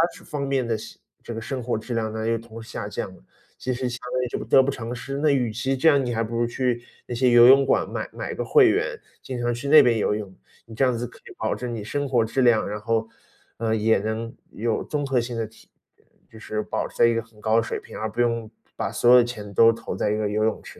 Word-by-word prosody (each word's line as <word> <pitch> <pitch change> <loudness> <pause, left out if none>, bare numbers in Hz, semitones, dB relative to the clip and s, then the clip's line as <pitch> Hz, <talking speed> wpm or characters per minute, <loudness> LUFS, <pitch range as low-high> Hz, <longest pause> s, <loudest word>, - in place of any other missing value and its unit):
这 - - -14
方 145 -3 -4
面 135 -2 0
的 115 -1 -1
生 110 - -11 0.2
这 120 - -6
个 115 - -5
生 125 +2 -4
活 120 - -1
质 115 +3 -6
量 110 -1 -1
呢， 110 0 -3
又 115 0 +1
同 115 0 -10
时 115 - -13
下 - - -5
降 - - -5
了， - - -21 0.3
其 130 - -2
实 125 0 -2
相 120 - -5 0.2
当 125 - +1
于 - - -1
就 - - -4
得 135 - +6
不 130 - 0
偿 120 -2 -5
失。 135 +3 -5
那 150 +1 +2
与 125 -5 +1
其 130 +5 -1
这 150 +5 +4
样， 140 -4 +3
你 120 - -2
还 115 0 0
不 115 +1 -5
如 120 - +2
去 120 0 -1 0.3
那 120 - -4
些 125 +1 +3
游 120 0 +8
泳 135 +1 +7
馆 - - +1
买 - - -4
买 - - -5
个 - - -3
会 - - +6
员， - - 0 0.3
经 125 -2 -5
常 120 0 0
去 130 +4 -5
那 155 +2 +9
边 120 -2 +3
游 105 - +1
泳， 105 -3 -6 0.3
你 115 - -12
这 135 - +3
样 125 -2 +1
子 120 +1 -3
可 - - -16
以 - - -14
保 - - -1
证 125 -1 -5
你 110 - -5
生 145 +6 -2
活 125 -4 +2
质 125 +4 -1
量， 115 -3 +4
然 105 +1 -4
后， 115 +1 -1 0.5
呃， 110 -1 0
也 110 +1 +3
能 110 +3 -4 0.2
有 115 +1 -1
综 145 -2 -3
合 135 -2 +1
性 120 0 -4
的 115 -1 -1
提 110 - -20 0.6
就 110 - -13
是 110 -1 -3
保 - - -3
持 - - -19
在 - - +6
一 115 - +4
个 115 - 0
很 115 -1 -21
高 110 +1 +2
的 115 - +3
水 - - -4
平， - - -11
而 110 - -2
不 110 +3 -2
用 115 -2 0 0.3
把 - - -1
所 120 - +3
有 125 - +9
的 120 - +6
钱 105 -4 -7
都 115 +3 +6
投 115 -4 -6
在 95 - 0
一 105 - 0
个 105 -1 -1
游 105 +1 0
泳 110 - -1
池 - - -12
115 Hz, 310 characters per minute, -24 LUFS, 110-125 Hz, 0.6 s, 那